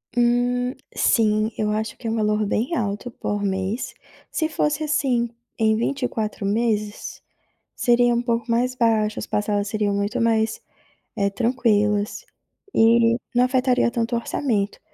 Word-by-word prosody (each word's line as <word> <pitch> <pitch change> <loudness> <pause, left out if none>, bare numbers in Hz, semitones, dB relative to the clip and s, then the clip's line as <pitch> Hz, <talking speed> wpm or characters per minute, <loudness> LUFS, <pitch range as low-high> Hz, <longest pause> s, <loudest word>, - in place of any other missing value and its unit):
Hum, 245 +1 +2 0.2
sim, 215 -1 +2
eu 210 -1 0
acho 215 +1 -3
que 235 - -7
é 225 - 0
um - - -1
valor 210 -1 +1
bem 235 +10 -1
alto 210 +1 -2
por 205 -3 -3
mês, 195 +4 -2 0.4
se 315 - -1
fosse 305 0 0
assim 265 -6 +1 0.3
em 220 -1 +3
24 230 -4 -2
meses, 210 0 -1 0.5
seria 240 0 +3
um 240 - +1
pouco 235 0 -1
mais 245 +2 +1
baixo, 220 -3 +1
as - - -6
parcelas 205 -1 0
seriam 210 -1 0
muito 205 +5 -1
mais, 225 -1 +1 0.6
eh, 200 0 +2
tranquilas 210 -2 +1 0.5
e 230 +1 +4 0.2
não 245 - +5
afetaria 255 -1 +2
tanto 235 0 -1
o - - +1
orçamento, 220 -5 -1
230 Hz, 145 wpm, -23 LUFS, 210-245 Hz, 0.6 s, não